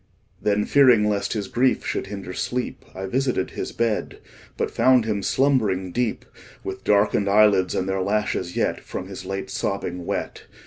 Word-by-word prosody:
Then, 105 0 +1
fearing 125 -7 +5
lest 100 -1 0
his 105 -3 -3
grief 125 +6 +1
should - - -2
hinder 95 -2 -6
sleep, 125 +5 -3
I 95 +1 -4
visited 125 -1 -1
his - - -5
bed, 115 -2 -1 0.4
But - - -1
found 130 -3 +4
him 105 -2 -1
slumbering 105 -8 +1
deep, 120 +2 -1 0.4
With 95 0 -6
darken'd 100 -1 +2
eyelids, 100 -2 +4
and 95 - -1
their 95 0 -1
lashes 100 -3 -1
yet - - 0
10 - - -14
From 95 - -6
his 95 -1 -8
late 95 +1 -4
sobbing 90 -3 -3
wet. - - -4
100 Hz, 170 wpm, -23 LUFS, 95-115 Hz, 0.4 s, fearing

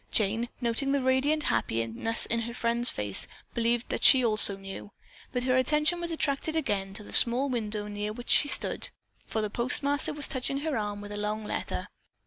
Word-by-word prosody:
Jane, 225 +3 +1
noting 250 +3 0
the 280 -2 0
radiant 275 +4 +1
happiness 115 - 0
in 230 - 0
her 235 +1 -5
friend's 235 0 +2
face, 105 -2 -1 0.3
believed 235 0 0
that - - -3
she 255 -3 +7
also 215 -3 +6
knew, 195 +1 -9 0.4
but 250 -1 -1
her 255 0 +1
attention 300 +6 +2
was 340 0 -3
attracted 310 0 -1
again 200 -10 -2
to 210 - -5
the - - -12
small 250 +4 +3
window 215 -4 -3
near 210 0 -4
which 245 +3 -6
she 290 - +6
stood, - - 0 0.4
for 220 - -2
the 215 - -2
postmaster 280 +5 +1
was 295 -1 -1
touching 275 +1 -3
her 310 -2 -2
arm 205 -1 -3
with 205 0 -9
a 205 - -5
long 210 +1 -3
letter. - - -4
235 Hz, 190 wpm, -28 LUFS, 210-275 Hz, 0.4 s, she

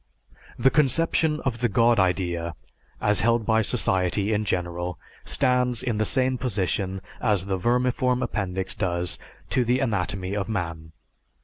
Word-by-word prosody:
The 135 - +4
conception 155 +2 +2
of 120 -4 -2
the 120 0 +1
God 115 +2 +3
idea 85 -3 0 0.4
as 105 -2 +2
held 115 0 +2
by 110 +1 +3
society 100 +1 0
in 105 0 0
general 90 -2 -2 0.3
stands 125 -1 +1
in 120 -4 -1
the 110 - +2
same 130 +2 +1
position 95 -4 -1 0.2
as 105 -5 +1
the 95 -1 -1
vermiform 125 +4 +1
appendix 95 -2 -2
does 90 -6 -2 0.3
to 125 - +2
the 125 +2 +1
anatomy 100 -5 -1
of 100 0 -2
man. 85 -6 -4
105 Hz, 140 wpm, -25 LUFS, 90-125 Hz, 0.4 s, The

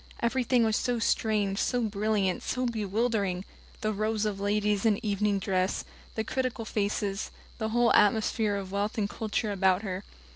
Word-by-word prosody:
Everything 245 0 +2
was 220 -1 +2
so 245 -1 0
strange, 210 -3 +1
so 245 - +1
brilliant, 205 -3 0
so 255 0 -1
bewildering 210 -4 0 0.4
the 215 0 0
rows 215 +1 0
of 205 -2 -2
ladies 205 0 +1
in 220 -3 +3
evening 205 0 +1
dress, 185 -1 0 0.3
the 220 - 0
critical 255 -2 -2
faces, 200 -1 -1 0.3
the 220 -1 -1
whole 240 +1 +3
atmosphere 210 0 +3
of 195 -1 -5
wealth 205 +2 -1
and 205 -2 0
culture 215 0 -2
about 190 0 +2
her. 190 -1 -4
210 Hz, 155 wpm, -29 LUFS, 200-225 Hz, 0.4 s, in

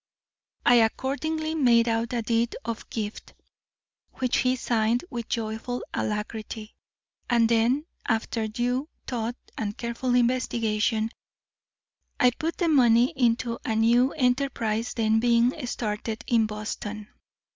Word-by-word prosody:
I 245 - +7
accordingly 285 +7 0
made 240 -6 +4
out 225 0 0
a 235 -2 -1
deed 230 +1 0
of 230 0 -5
gift, 215 -2 -5 0.8
which 255 -1 0
he 255 0 +2
signed 235 +1 0
with 235 -2 -5
joyful 225 +2 -3
alacrity, 215 +1 -4 0.6
and 235 -2 +4
then 235 +6 +2 0.2
after 225 0 0
due 245 +6 -1 0.2
thought 235 -1 -3 0.2
and 210 -2 -3
careful 240 +1 -1
investigation, 230 -3 +1 1.1
I 250 - +5
put 320 +7 -3
the 345 - +1
money 245 -5 +5
into 235 -2 +1
a 220 - -1
new 240 +4 +4
enterprise 250 -4 0
then 220 -1 +2
being 235 +1 +3
started 220 -1 -3
in 225 -2 +3
Boston. 210 0 -5
235 Hz, 120 wpm, -26 LUFS, 220-250 Hz, 1.1 s, I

